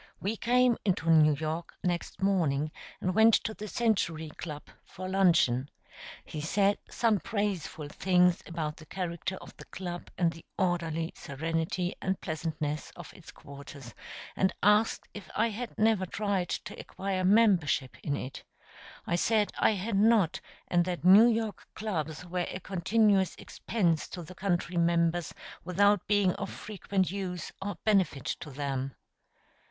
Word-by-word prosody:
We 205 +4 -2
came 245 +1 +3
into 175 -4 +1
New 155 -2 +6
York 160 +3 -4
next 175 +1 -2
morning, 155 -7 +1 0.3
and 185 - 0
went 220 +2 +6
to 220 - -1
the 215 0 -7
Century 185 -9 0
Club 150 -1 -7 0.2
for 185 +1 -8
luncheon. 170 -9 +3 0.6
He 150 - -6
said 200 +6 +2
some 225 -4 +2
praiseful 195 -8 -3
things 180 +1 +3
about 155 -2 -4
the 155 - -13
character 180 +1 -3
of - - -12
the - - -11
club 175 -1 -6
and 170 -2 +2
the 165 - -13
orderly 170 -3 -1
serenity 165 +5 -2
and 190 0 -1
pleasantness 155 -2 -3
of - - -10
its - - -13
quarters, 140 -3 -11 0.4
and 190 - +2
asked 210 +3 +3
if 205 - -9
I 230 +2 +2
had 225 +2 -6
never 215 -4 +2
tried 200 -2 -1
to - - -5
acquire 190 -1 -3
membership 185 - +3
in 140 - -1
it. 130 +2 -7 0.6
I 170 - 0
said 210 +3 +2
I - - +4
had 200 +1 -2
not, 200 -4 +3 0.3
and 175 0 +3
that 180 -2 -3
New 200 +6 +9
York 225 -3 -1
clubs 165 -6 -3
were 180 0 -2
a 185 - -5
continuous 195 +1 +2
expense 175 -9 -1
to 175 - -7
the 165 - -10
country 180 -2 -1
members 170 0 +2 0.3
without 200 +3 +3
being 205 -3 +3
of - - -4
frequent 195 -3 -2
use 185 -3 -4
or 200 +1 -3
benefit 190 - +2
to 175 -2 -4
them. 135 -1 -3
180 Hz, 150 wpm, -29 LUFS, 160-205 Hz, 0.6 s, New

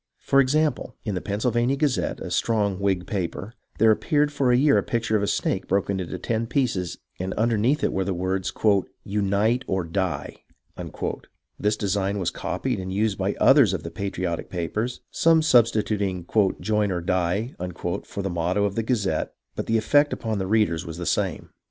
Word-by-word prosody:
For 135 - +2
example, 140 -2 +1
in 105 - -1
the 90 - -2
Pennsylvania 120 +5 0
Gazette, 140 -2 0
a 90 - -6
strong 100 0 +1
Whig 95 -3 0
paper, 95 +1 -4 0.2
there 110 +1 +5
appeared 145 +6 +2
for 135 -3 +1
a 120 - +5
year 140 +2 +4
the - - +3
picture 115 -2 -1
of 105 - +2
a 100 - 0
snake - - -1
broken 100 0 0
into 90 - -4
ten 115 0 -2
pieces, 115 -9 -1 0.2
and 95 +1 -3
underneath 115 +5 +1
it - - +1
were 95 - 0
the 95 - -2
words, 95 +1 -1 0.5
"Unite 105 +4 +1
or 95 -1 0
Die." 90 +2 -3 1.2
This 105 +1 +1
design 100 0 0
was 95 -4 -1
copied - - -3
and 95 0 -5
used 100 +1 0
by 95 +2 0
others 135 -9 +6
of 80 - -5
the 85 - -6
patriotic 90 -2 -3
papers, 105 +8 -3
some 165 -1 +4
substituting 110 - +2 0.3
"Join 105 -2 +1
or 90 -1 -1
Die 90 +7 0 0.2
" 85 - -3
for 100 - -5
the 95 - -1
motto 90 +4 0
of 100 - -1
the 115 - 0
Gazette, 105 -8 -1 0.2
but - - -4
the 115 - +2
effect 145 +7 +3
upon 110 -3 -2
the 95 - -2
readers 100 -6 +2
was 80 -2 -7
the 85 - -5
same. - - -1
100 Hz, 180 wpm, -24 LUFS, 95-115 Hz, 1.2 s, others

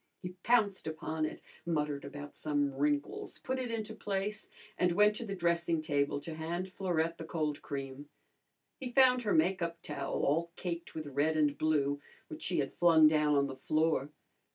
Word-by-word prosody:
He 180 - -3
pounced 210 -7 +2
upon 155 0 -2
it, - - -9 0.2
muttered 150 -4 -1
about 145 +1 -8
some 145 -2 0
wrinkles, 145 +1 -1
put 260 0 -3
it 255 -2 -3
into 220 -1 -3
place, 205 -1 -3 0.3
and 180 -1 +2
went 210 +3 +5
to 235 - -5
the 200 - -3
dressing 170 -2 +1
table 145 -2 0
to 165 - -6
hand 170 +4 -3
Florette 170 -3 -1
the - - -5
cold 155 -3 -2
cream. 140 0 -6 0.7
He 260 - -4
found 255 -1 +5
her 210 -4 0
make 180 +4 +3
up 170 0 -2
towel, 150 - -3
all 165 +4 +1
caked 170 -2 -5
with 155 -1 -4
red 145 +3 +1
and 145 -2 +3
blue, 145 -2 +1 0.3
which 315 0 -8
she 180 - -1
had 140 -3 -1
flung 165 -3 +6
down 150 -1 +3
on 140 0 +3
the 135 -1 -5
floor. 155 -1 +1
160 Hz, 180 wpm, -32 LUFS, 145-185 Hz, 0.7 s, flung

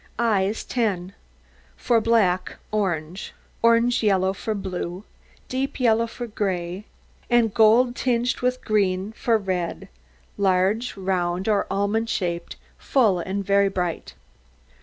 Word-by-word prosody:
EYES 215 -3 +1
10 195 -6 -2 0.6
For 235 -2 +2
black, 200 -6 +1
orange; 180 -4 -2 0.3
orange 230 +1 +3
yellow 190 -3 +2
for 215 +2 -3
blue; 185 -1 -5 0.4
deep 270 +2 -3
yellow 230 -2 +3
for 240 +1 -6
gray; 190 -3 -3 0.4
and 235 -3 +3
gold, 235 +3 +4
tinged 245 -1 0
with 250 0 -1
green, 195 -2 +1
for 225 +1 +1
red; 185 -4 -3 0.5
large, 200 +5 +1
round, 185 -1 -1
or 210 -2 +1
almond 210 +3 0
shaped, 170 -4 -2 0.2
full 220 -9 +2
and 195 +3 -3
very 200 0 +3
bright. 175 - -3
200 Hz, 115 wpm, -23 LUFS, 185-230 Hz, 0.6 s, gold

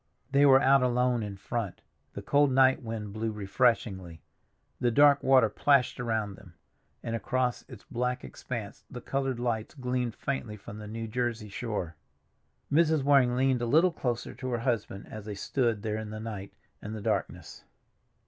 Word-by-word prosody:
They 140 +1 +5
were 135 -1 +7
out 135 -1 +5
alone 125 -1 +2
in 100 -2 -5
front, 105 0 -4 0.3
the - - -7
cold 145 -1 +3
night 130 0 +4
wind 110 -4 -5
blew 110 +1 -2
refreshingly, 100 -5 0 0.6
the 120 - +2
dark 140 +3 +5
water 130 -3 +5
plashed 135 +4 +2
around 110 -4 -1
them, 90 -3 -15 0.5
and 115 - -3
across 125 +1 -1
its 120 -6 -11
black 125 +1 -1
expanse 110 -5 -7
the 125 - -7
colored 135 0 -2
lights 115 -1 -2
gleamed 125 -3 -2
faintly 120 -6 -4
from 105 +1 -10
the 105 - -8
New 115 +1 -5
Jersey 120 -2 -2
shore. 100 -6 -4 0.8
Mrs. 160 -2 +3
Waring 135 -3 +4
leaned 130 -1 +2
a 120 - -1
little 165 +8 +4
closer 120 -5 -3
to 130 - -6
her 120 - 0
husband 115 -5 -2
as 110 -2 -9
they 105 -1 -5
stood 115 0 -1
there 110 -1 -2
in 110 -1 -5
the 110 0 -6
night 105 -3 -6 0.3
and 105 +1 -6
the 110 - -6
darkness. - - -3
120 Hz, 170 wpm, -29 LUFS, 105-130 Hz, 0.8 s, were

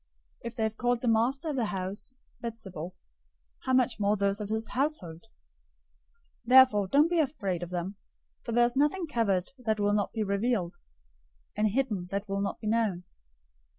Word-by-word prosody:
If 235 0 -6
they 225 - -1
have 220 0 -1
called 245 -1 +1
the 250 - -2
master 245 +8 +2
of 290 - -2
the 240 - +1
house 200 +5 -4 0.3
Beelzebul, 190 -7 -6 0.7
how 260 - +1
much 255 -4 +2
more 205 +1 +2
those 200 +1 0
of 205 - -5
his 220 +1 -2
household! 250 - -2
010:026 - - -26 1.2
Therefore 250 -5 +6
don't 290 - +4
be 345 0 +1
afraid 205 - -1
of 175 - -5
them, 180 +2 -4 0.5
for 235 - -5
there 240 +1 +5
is 240 +1 -1
nothing 300 +6 +2
covered 205 - 0
that 220 -3 -1
will 205 0 +2
not 205 -1 0
be 220 - -1
revealed; 200 -2 -1 0.8
and 215 +1 +2
hidden 210 -5 -1
that 200 +2 -3
will 195 0 -1
not 200 - -2
be - - -9
known. 215 -5 +1
220 Hz, 180 wpm, -29 LUFS, 200-250 Hz, 1.2 s, Therefore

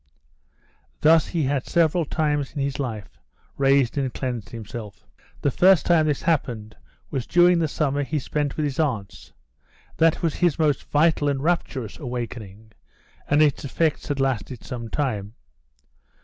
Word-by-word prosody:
Thus 160 +1 +5
he 165 -3 -1
had 135 -1 -1
several 170 0 +2
times 145 -2 -1
in - - -5
his 140 0 -3
life 110 -7 -5 0.4
raised 135 -1 +2
and 135 -2 -1
cleansed 125 -6 -4
himself. 110 -2 -8 0.4
The 140 - +1
first 185 +1 +5
time 160 -3 +4
this 145 -2 -1
happened 120 -10 -1 0.4
was 130 -4 -3
during 175 0 +5
the 160 - +1
summer 145 -1 -1
he 150 +2 -2
spent 145 0 -2
with 155 - 0
his 140 -1 -3
aunts; 120 -11 -2 0.7
that 165 +1 +3
was 165 -3 +1
his 175 -5 +2
most 150 -4 +1
vital 150 -1 +3
and 135 -1 -2
rapturous 145 - -2
awakening, 115 -5 -6 0.6
and 145 +1 +4
its 145 -3 +1
effects 155 +3 -1
had 145 -1 -2
lasted 130 -2 -2
some 120 -2 -6
time. 110 -7 -2
140 Hz, 150 wpm, -24 LUFS, 125-155 Hz, 0.7 s, Thus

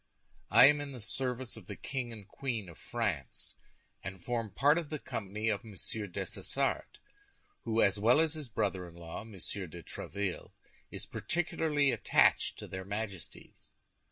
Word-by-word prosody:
I - - +10
am 145 +1 +6
in 140 -1 -5
the 125 - -7
service 125 +2 -2
of 105 -5 -11
the 100 - -5
King 125 0 -3
and 105 -4 -9
Queen 115 -8 -3
of 85 - -13
France, 100 - -2 0.5
and 95 +1 -5
form 115 +3 -1
part 145 - +4
of 160 -4 -6
the 155 - -2
company 110 -5 -3
of 105 -3 +1
Monsieur 105 0 -4
Dessessart, 90 - -1 0.7
who, 115 -1 +3
as 100 0 +3
well 120 +7 +6
as 160 -1 +3
his 150 -5 -5
brother 95 -4 0
in 85 - -13
law, 85 +2 -6
Monsieur 100 -3 -5
de 85 +1 -9
Tréville, 100 +2 -4 0.4
is - - -6
particularly 155 -4 +1
attached - - +4
to - - -7
their 95 0 -5
Majesties. 100 -2 -6
110 Hz, 160 wpm, -33 LUFS, 95-130 Hz, 0.7 s, I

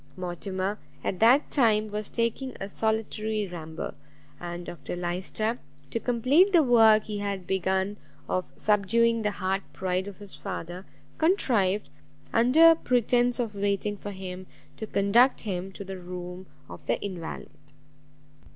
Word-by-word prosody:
Mortimer, 185 +3 -3 0.2
at 185 - -2
that 245 +6 +5
time, 215 -5 +3
was 210 0 -4
taking 235 +3 -2
a 195 - -4
solitary 220 0 -1
ramble; 160 -3 -6 0.5
and 175 0 -6
Dr 175 -1 -6
Lyster, 185 +6 -2 0.3
to 230 - -1
complete 260 - +3
the 340 -4 +6
work 225 -4 +6
he 210 -1 -4
had 200 -2 -3
begun 190 +2 0 0.3
of 185 - -2
subduing 230 +3 +2
the 210 - +1
hard 195 -1 -1
pride 185 +1 -1
of 200 - -8
his 205 -2 -13
father, 180 -1 -6 0.3
contrived, 230 - +2 0.4
under 290 +9 +7
pretence 245 -4 +1
of 230 -3 -1
waiting 200 +1 -1
for 205 - -7
him, 185 -1 -7 0.3
to 220 - -5
conduct 215 +7 +4
him 190 -2 -4
to 200 - -7
the 190 -1 -7
room 180 +1 -7 0.2
of - - -11
the - - +1
invalide. 180 -5 -6
205 Hz, 140 wpm, -27 LUFS, 185-230 Hz, 0.5 s, under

